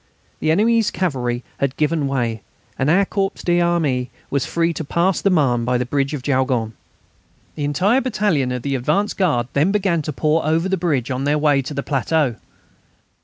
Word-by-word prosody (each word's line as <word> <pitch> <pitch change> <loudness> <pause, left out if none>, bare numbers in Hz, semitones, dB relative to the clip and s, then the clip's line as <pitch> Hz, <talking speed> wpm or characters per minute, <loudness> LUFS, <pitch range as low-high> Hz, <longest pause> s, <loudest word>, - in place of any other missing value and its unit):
The 155 - -1
enemy's 220 +6 +3
cavalry 125 -9 -2 0.2
had 140 -1 -1
given 150 -1 +1
way, 120 -5 -1 0.4
and 130 +3 +1
our 195 +5 +4
corps 195 0 0
d'armée 170 -7 +1 0.2
was 140 -1 0
free 170 0 0
to 160 - -4
pass 170 +5 0
the 200 - +2
Marne 135 -9 +2
by 125 +1 +1
the 125 - -1
bridge 140 +3 -1
of 130 - -7
Jaulgonne. 130 -5 0 0.8
The 145 - -3
entire 195 - +2
battalion 205 - 0
of 125 -1 -4
the 140 - -2
advance 150 - 0
guard 145 -11 +1
then 155 +7 +2
began 190 -5 +1
to 150 - -4
pour 155 +3 +1
over 160 +4 +1
the 190 - +1
bridge 150 -8 -1
on 130 +2 -2
their 145 +1 +2
way 145 -2 +3
to 140 +3 -7
the 140 - -2
plateau. 140 -2 0
150 Hz, 185 wpm, -20 LUFS, 130-175 Hz, 0.8 s, our